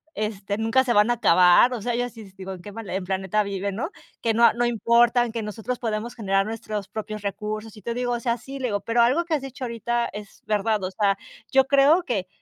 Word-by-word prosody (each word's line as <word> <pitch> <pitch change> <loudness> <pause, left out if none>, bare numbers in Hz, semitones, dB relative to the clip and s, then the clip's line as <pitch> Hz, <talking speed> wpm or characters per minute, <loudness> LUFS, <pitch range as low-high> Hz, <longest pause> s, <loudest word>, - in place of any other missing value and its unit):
este, 205 -1 -3
nunca 225 +4 +2
se 245 -2 +1
van 210 +2 +4
a - - +4
acabar, 180 +2 +5
o 235 - -4
sea, 240 - -1
yo 245 +1 0
así 230 -2 -9
digo: 190 0 -7
"¿En 180 - -10
qué 205 - -8
mal 225 0 -8 0.2
planeta 190 +2 0
vive, 200 0 -3
no?" 220 - -4 0.3
Que 230 - +1
no 235 +1 +6
no 240 +1 0
importan, 240 +1 +3
que 225 -1 -4
nosotros 220 +4 -4
podemos 225 0 -3
generar 195 -3 0
nuestros 215 -3 -5
propios 215 +1 -6
recursos. 215 +2 -5
Y 210 - -14
te 235 - -2
digo, 245 0 -1
o 240 - -1
sea, 235 0 0
sí, 270 +4 -9
le 265 - -3
digo, 205 -1 -1
pero 230 +3 +2
algo 265 +9 +3
que 330 -2 0
has 285 - -3
dicho 260 -1 -6
ahorita 235 0 -1
es 210 -1 -10
verdad, 210 -1 0
o 185 - -1
sea, 200 0 +1 0.4
yo 265 0 +5
creo 280 +5 +5
que 200 - -2
225 Hz, 235 wpm, -24 LUFS, 205-240 Hz, 0.4 s, no